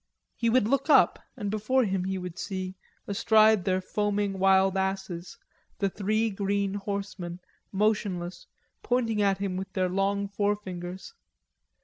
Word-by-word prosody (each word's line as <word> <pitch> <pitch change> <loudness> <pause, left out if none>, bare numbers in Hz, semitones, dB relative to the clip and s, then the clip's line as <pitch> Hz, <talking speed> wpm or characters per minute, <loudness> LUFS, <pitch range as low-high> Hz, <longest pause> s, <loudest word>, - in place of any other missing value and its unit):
He 230 - +1
would 230 -2 +3
look 275 +4 0
up, - - +5 0.2
and 205 -4 -3
before 215 +5 +2
him 190 -4 -1
he 190 0 -2
would 180 -1 -6
see, 185 -2 -4 0.3
astride 215 0 +4
their 185 -1 +2
foaming 205 0 -1
wild 190 0 +4
asses, 190 -2 -3 0.4
the 195 -1 0
three 215 +3 0
green 200 0 -1
horsemen 195 -3 -4 0.3
motionless, 190 -4 -1 0.3
pointing 230 -4 0
at 195 -1 +3
him 195 -2 -2
with 190 0 -5
their 185 -1 +1
long 200 +2 0
forefingers. 195 - -3
195 Hz, 135 wpm, -28 LUFS, 190-210 Hz, 0.4 s, up